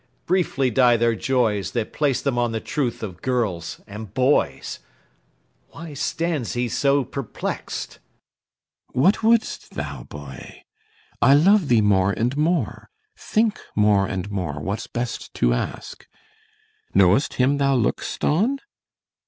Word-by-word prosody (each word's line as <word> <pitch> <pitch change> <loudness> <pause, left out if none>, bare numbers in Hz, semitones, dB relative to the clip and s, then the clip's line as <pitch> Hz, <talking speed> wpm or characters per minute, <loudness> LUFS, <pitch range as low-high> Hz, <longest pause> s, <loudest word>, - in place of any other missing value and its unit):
Briefly 165 -8 +1
die 120 0 +4
their 115 0 +2
joys 110 -6 0
That 115 -3 -2
place 145 -4 0
them 140 -3 0
on 120 -1 0
the 110 - -1
truth 135 -4 -2
of 90 -4 -7
girls 105 -10 -2
and 105 -1 -9
boys. 130 +5 +1 0.9
Why 165 -2 -9
stands 155 -2 -2
he 120 0 -1
so 140 +4 +2
perplex'd? 130 -1 -5 1.0
CYMBELINE. 130 - +2
What 195 +5 +4
wouldst 225 0 +1
thou, 70 -3 -5
boy? 70 -3 -10 0.6
I 135 - +7
love 190 +3 +5
thee 120 -4 +4
more 100 -1 +3
and 120 +6 -1
more; 155 -3 -1 0.3
think 225 - 0 0.2
more 105 -2 +3
and 95 +1 -4
more 85 -7 -3
What's 100 +8 -4
best 120 0 -4
to - - +2
ask. - - -5 0.9
Know'st 100 +7 +4
him 135 +3 +2
thou 140 -1 +3
look'st 120 -4 -1
on? 220 - +2
120 Hz, 135 wpm, -23 LUFS, 100-145 Hz, 1.0 s, I